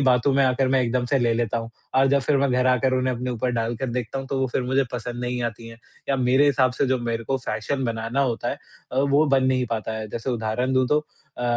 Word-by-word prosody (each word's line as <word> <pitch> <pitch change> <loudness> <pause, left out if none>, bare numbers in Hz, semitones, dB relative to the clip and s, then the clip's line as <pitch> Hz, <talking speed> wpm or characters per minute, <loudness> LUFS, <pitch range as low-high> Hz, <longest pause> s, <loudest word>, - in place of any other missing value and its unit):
बातों 130 0 +3
में 140 - +4
आकर 130 0 +2
मैं 130 0 +3
एकदम 125 +1 0
से 135 +2 +2
ले 120 -2 +2
लेता 115 0 0
हूँ। 115 0 -6 0.2
और 135 +1 +5
जब 140 0 +3
फिर 140 +3 +1
मैं 140 0 +2
घर 125 0 +2
आकर 130 +1 +2
उन्हें 130 0 0
अपने 125 +1 -3
ऊपर 125 +1 -1
डाल 115 0 -1
कर 130 - -3
देखता 125 +2 -3
हूँ, 135 - -5
तो 135 - -2
वो 130 - +2
फिर 130 - 0
मुझे 130 +2 +1
पसंद 120 0 -5
नहीं 125 0 -2
आती 115 0 -5
हैं 115 0 -12 0.3
या 135 - +2
मेरे 130 +3 +3
हिसाब 130 -2 +3
से 130 - 0
जो 130 0 +1
मेरे 115 -1 -3
को 135 - 0
फैशन 125 +4 -3
बनाना 115 +3 -2
होता 125 -4 0
है - - -3 0.4
अ, - - -4
वो 140 +2 +3
बन 135 -2 +3
नहीं 130 -1 +1
पाता 110 0 -4
है, 110 -1 -6
जैसे 120 +4 -4
उदाहरण 120 +2 -1
दूँ 130 -1 +3
तो 150 - +4 0.4
अ, 125 - -3
125 Hz, 270 wpm, -24 LUFS, 120-135 Hz, 0.4 s, और